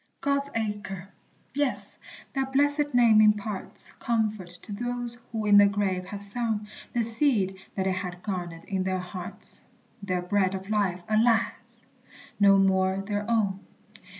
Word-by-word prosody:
God's 280 0 0
Acre! 205 -4 -4 0.4
Yes, 285 -1 -2 0.3
that 270 -1 -2
blessed 290 0 +3
name 230 -3 +6
imparts 210 -1 +1
Comfort 215 -5 -1
to - - -10
those 240 +2 -4
who 220 -2 -2
in 205 -1 +7
the 205 - +7
grave 195 -2 -1
have 200 +2 -2
sown 215 0 +1 0.3
The 240 - +1
seed 225 -5 +1 0.2
that 190 - 0
they 190 - +2
had 180 -1 -5
garnered 175 -4 -4
in 190 -2 -2
their 185 0 0
hearts, 180 0 -2 0.4
Their 185 -3 -2
bread 190 +1 +1
of 190 +2 -6
life, 190 -4 0
alas! 225 +1 +3 0.9
no 200 -1 +6
more 190 -1 +3
their 205 +1 -3
own. 205 -4 +1
205 Hz, 145 wpm, -27 LUFS, 190-230 Hz, 0.9 s, in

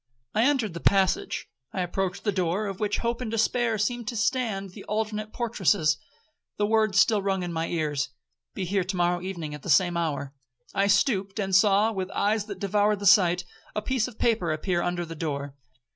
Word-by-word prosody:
I 220 +3 +3
entered 255 - +1
the 170 - -5
passage. 190 +1 +1 0.2
I 190 - -2
approached 190 +2 -2
the 205 - +1
door, 185 +2 0
of 195 -2 -5
which 210 -1 0
hope 235 +1 -2
and 245 - -3
despair 225 +1 +1
seemed 235 +2 -1
to 245 - -3
stand 225 -4 -1
the 195 +1 -11
alternate 215 0 -2
portresses. 205 -9 +1 0.6
The 205 - +2
words 215 -2 +3
still 215 -1 +4
rung 195 -1 -1
in 175 -1 -4
my 165 0 -1
ears. 150 -4 -1 0.5
'Be - - -2
here 195 +1 0
to 185 +2 -4
morrow 175 0 +1
evening 170 -5 -5
at 150 - -8
the - - -7
same 175 -2 +4
hour.' 145 -5 -2 0.4
I 195 +1 +2
stooped, 200 -2 +2
and 195 -3 0
saw, 205 +3 +5
with 190 -3 -3
eyes 210 0 +1
that 200 -3 -7
devoured 205 +2 +1
the 200 - -6
sight, 180 -2 +5 0.3
a 210 - 0
piece 255 -1 0
of 240 -3 -11
paper 220 -8 +1
appear 175 +3 0
under 175 0 -1
the 165 - -7
door. 145 -3 -4
195 Hz, 200 wpm, -26 LUFS, 175-215 Hz, 0.6 s, saw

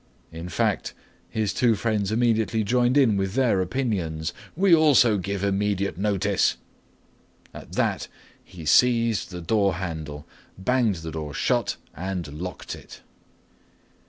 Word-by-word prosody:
In 85 +2 -7
fact, - - -1 0.3
his 110 -2 -1
two 120 -3 +3
friends 105 -2 -1
immediately 110 -2 +1
joined 125 +4 +2
in 120 -8 +4
with 95 +1 -2
their 120 -8 +3
opinions, 90 -7 -2 0.2
"We 190 +1 +4
also 140 -9 +5
give 100 +1 -3
immediate 100 0 0
notice." 100 0 +1 1.0
At - - -11
that - - 0 0.4
he 85 -3 -11
seized 115 +4 +3
the 90 -2 -7
door 100 +2 +1
handle, 80 -5 -5 0.3
banged 115 +1 +1
the 80 - -4
door 75 -2 -5
shut, - - 0 0.2
and 90 0 -4
locked 90 +1 -6
it. - - -12
100 Hz, 130 wpm, -25 LUFS, 90-115 Hz, 1.0 s, also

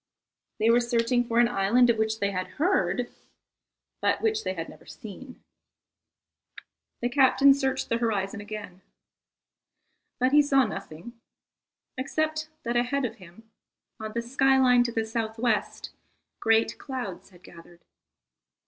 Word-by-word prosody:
They 225 +1 +3
were 235 - +5
searching 240 0 +1
for 230 - -1
an 240 0 +6
island 240 +2 +3
of 225 - -3
which 220 0 0
they 200 0 0
had 185 -1 -3
heard, 245 - +1 0.9
but - - +1
which 440 -1 0
they 185 - -3
had 165 -1 -5
never - - -15
seen. 250 +5 -11 1.6
The 240 - +1
captain 275 +1 +5
searched 270 -1 -1
the 230 - 0
horizon 205 -3 -1
again, 205 -3 -8 1.4
but 255 +1 +2
he 295 +1 +7
saw 275 -2 +3
nothing, 195 +3 -8 0.8
except 310 +3 -2
that 235 0 -2
ahead 250 +3 +1
of 230 -1 -5
him, 195 +5 -16 0.5
on 215 0 -6
the 235 - -2
sky 270 +2 +2
line 250 -2 +5
to 235 - -2
the 225 - -1
S.W., 220 0 -4 1.0
great 225 0 +2
clouds 250 -11 -6
had 180 -1 -20
gathered. 170 0 -16
235 Hz, 140 wpm, -26 LUFS, 210-260 Hz, 1.6 s, he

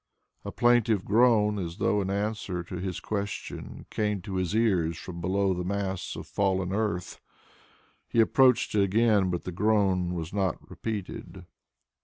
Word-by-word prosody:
A - - -5
plaintive 115 -4 +3
groan 105 -2 +4
as 85 -2 -5
though 105 - +1
in 95 - -2
answer 100 -3 -2
to 90 +1 -7
his 90 0 -4
question 100 +2 -5
came 105 -2 0
to 95 -2 -4
his 95 +2 -1
ears 90 -8 +2
from 85 -2 -8
below 95 +2 +1
the 90 0 -3
mass 95 0 -3
of - - -7
fallen 95 -2 0
earth. 100 -5 -2 0.9
He 115 - 0
approached 125 +2 +4
it 105 - +3
again, 105 -1 +3
but 85 -1 -2
the 90 - -5
groan 95 -2 +1
was 80 0 -5
not 95 -4 -1
repeated. 105 -4 -6
100 Hz, 155 wpm, -28 LUFS, 90-105 Hz, 0.9 s, groan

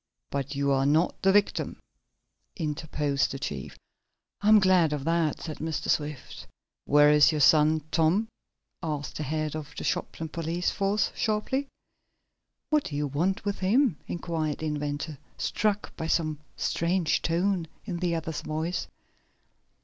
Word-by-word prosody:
"But 140 0 -3
you 140 0 +1
are 135 0 +2
not 155 +4 +2
the 195 - +4
victim," 205 0 +1 0.8
interposed 150 -3 -1
the 135 - -4
chief. 75 - -5 0.6
"I'm 215 +1 +7
glad 185 -5 +4
of 145 -2 -3
that," 165 -1 +1
said 155 -2 -6
Mr. 160 0 -3
Swift. 145 -3 -2 0.4
"Where 145 0 +6
is 150 +1 +6
your 155 - -1
son, 155 +1 +5
Tom?" 170 +7 +2 0.5
asked 150 -4 -4
the - - -4
head 155 +1 -2
of 155 -2 -7
the - - -4
Shopton 160 - -2
police 165 +2 -1
force, 200 +1 0
sharply. 225 +6 -1 1.0
"What 300 -2 +3
do 145 - -5
you 145 +1 0
want 175 +10 -1
with 200 -1 -2
him?" 205 - +2
inquired 160 -3 -2
the 160 - -5
inventor, 150 -1 -3 0.2
struck 210 -1 -1
by 160 - -4
some 155 -3 0 0.2
strange 170 0 +1
tone 175 +1 0 0.2
in 185 -5 -3
the 170 -1 0
other's 160 -1 -3
voice. 160 +3 -3
160 Hz, 145 wpm, -27 LUFS, 150-185 Hz, 1.0 s, I'm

